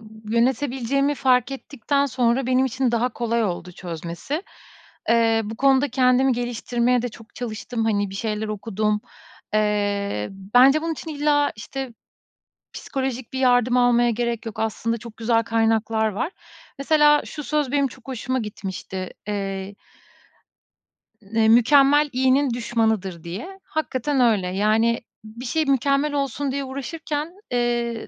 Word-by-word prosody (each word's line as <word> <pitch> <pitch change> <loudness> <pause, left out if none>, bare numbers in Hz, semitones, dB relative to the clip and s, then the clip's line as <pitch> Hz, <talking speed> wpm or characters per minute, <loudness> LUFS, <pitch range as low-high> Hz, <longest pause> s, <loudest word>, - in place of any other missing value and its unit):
b 220 0 -7
yönetebileceğimi 265 +3 +1
fark 255 -2 +2
ettikten 280 +1 -1
sonra 245 0 +1
benim 255 +1 +3
için 255 0 0
daha 235 +1 +2
kolay 235 0 0
oldu 180 -2 -4
çözmesi. 170 - -5 0.7
Eee, 225 -1 +4
bu 220 +2 -6
konuda 275 +2 +3
kendimi 255 +1 +3
geliştirmeye 245 0 0
de 245 - -2
çok 225 0 -15
çalıştım, 230 0 -4
hani, 205 -3 0
bir - - -8
şeyler 215 +1 -2
okudum. 215 0 -1 0.5
Eee, 205 - 0
bence 245 +10 +4
bunun 330 0 -1
için 320 +1 -7
illa, 290 -1 +2
işte, 265 +3 -6 0.8
psikolojik 260 -3 -4
bir 260 - -3
yardım 245 -1 +3
almaya 240 -1 +4
gerek 235 0 -2
yok. 225 - -6
Aslında 225 +1 -1
çok 225 0 -11
güzel 230 0 +2
kaynaklar 225 -1 +1
var. 225 - -3 0.5
Mesela 295 +1 +4
şu 300 - -7
söz 295 -3 -1
benim 285 -1 +3
çok 260 +1 -16
hoşuma 255 0 -2
gitmişti. 190 -4 -5 0.2
Eee 195 -1 -3 1.5
ne 220 +2 +1
"Mükemmel 275 +5 +5
iyinin 260 +2 +3
düşmanıdır." 220 -7 -1
diye. 235 - -7
Hakikaten 285 -3 -1
öyle. 220 -6 +3
Yani, 215 +5 +2 0.2
b 220 +2 -11
bir - - -6
şey 315 +6 0
mükemmel 275 +1 +2
olsun 280 -1 -1
diye 280 0 -2
uğraşırken, 295 +4 -4 0.2
eee, 240 -1 0
240 Hz, 135 wpm, -23 LUFS, 220-270 Hz, 1.5 s, Mükemmel